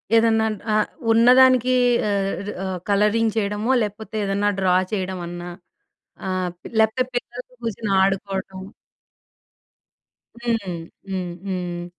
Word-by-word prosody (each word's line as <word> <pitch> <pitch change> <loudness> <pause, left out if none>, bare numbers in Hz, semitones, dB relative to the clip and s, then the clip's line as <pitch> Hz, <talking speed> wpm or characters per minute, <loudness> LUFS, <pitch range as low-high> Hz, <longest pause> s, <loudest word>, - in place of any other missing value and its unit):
ఏదన్నా 225 -1 +4 0.3
ఆహ్, 215 0 +2 0.2
ఉన్నదానికి 255 +2 +6 0.3
ఆహ్, 200 0 -1 0.2
ఆహ్, 185 -1 -3
కలరింగ్ 210 +2 +2
చేయడమో 210 +3 0
లేకపోతే 215 +1 -5
ఏదన్నా 200 +1 +1
డ్రా 185 -1 +3 0.2
చేయడమన్నా 175 -3 -4 0.8
ఆహ్, 185 -1 -1 0.3
లేకపోతే 220 +4 +3
పిల్లలతో 245 +1 -5
కూర్చొని 220 -2 -3
ఆడుకోవటం. 190 -1 -2 1.8
హ్మ్, 225 -6 -1 0.4
హ్మ్, 180 -2 -3
హ్మ్. 175 -2 -3
205 Hz, 95 wpm, -22 LUFS, 185-225 Hz, 1.8 s, ఉన్నదానికి